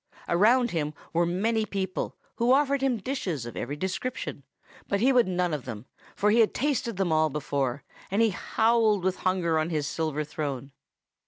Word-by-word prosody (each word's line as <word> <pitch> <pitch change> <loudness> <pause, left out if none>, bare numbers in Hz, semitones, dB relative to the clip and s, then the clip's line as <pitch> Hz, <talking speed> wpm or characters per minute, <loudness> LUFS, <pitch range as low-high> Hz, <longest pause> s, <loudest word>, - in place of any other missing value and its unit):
Around 235 +7 +4
him 150 -3 -2 0.2
were 170 +1 +2
many 220 +6 +1
people, 190 -3 -3 0.2
who 240 +2 +4
offered 280 0 +3
him 265 -3 +2
dishes 190 - -3
of 120 - -8
every 145 - -3
description; 190 - -4 0.5
but 200 - 0
he 260 +5 +4
would 245 -4 +4
none 180 -2 0
of 145 -4 -3
them, 115 -2 -7 0.3
for 210 +1 +2
he 230 - +4
had 225 - +4
tasted 240 -6 -1
them 190 -4 0
all 155 0 +3
before; 140 -2 -2 0.3
and 200 - 0
he 225 - +3
howled 220 0 +2
with 190 0 0
hunger 175 -4 +1
on 155 +1 -1
his 155 -4 -1
silver 155 0 -2
throne. 140 -3 -4
185 Hz, 180 wpm, -27 LUFS, 155-230 Hz, 0.5 s, Around